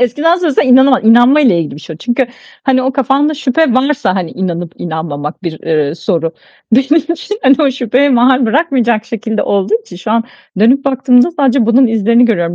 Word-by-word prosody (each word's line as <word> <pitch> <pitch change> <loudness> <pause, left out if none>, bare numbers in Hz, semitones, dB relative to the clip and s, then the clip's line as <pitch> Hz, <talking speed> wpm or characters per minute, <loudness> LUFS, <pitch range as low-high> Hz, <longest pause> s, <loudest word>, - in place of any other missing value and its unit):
Eskiden 290 +8 +1
söylesen 325 -6 0
inanama 260 +1 +4
inanmayla 240 - +4
ilgili 160 -4 -4
bir - - -11
şey 160 - -9
o. - - -12
Çünkü 245 +7 -2 0.4
hani, 260 -1 +1
o 265 +1 -1
kafanda 275 +4 0
şüphe 280 0 0
varsa, 260 -8 0
hani, 180 -4 -3
inanıp 175 -2 -5
inanmamak 160 -1 -6
bir, 160 -3 -5
eee, 155 -2 -1
soru. 165 -2 -2 0.4
Benim 295 +6 +2
için 400 +6 -6
hani, 265 +1 +4
o 285 - +2
şüpheye 255 +2 0
mahal 250 +1 +3
bırakmayacak 240 -5 0
şekilde 225 -2 -4
olduğu 200 +2 -1
için 180 - -13
şu 185 +4 -6
an 230 0 +1 0.3
dönüp 250 +6 +3
baktığımda 260 0 +2
sadece 275 -7 0
bunun 250 +3 +4
izlerini 230 +2 +2
görüyorum. 175 -7 -1
245 Hz, 180 wpm, -12 LUFS, 190-270 Hz, 0.4 s, inanama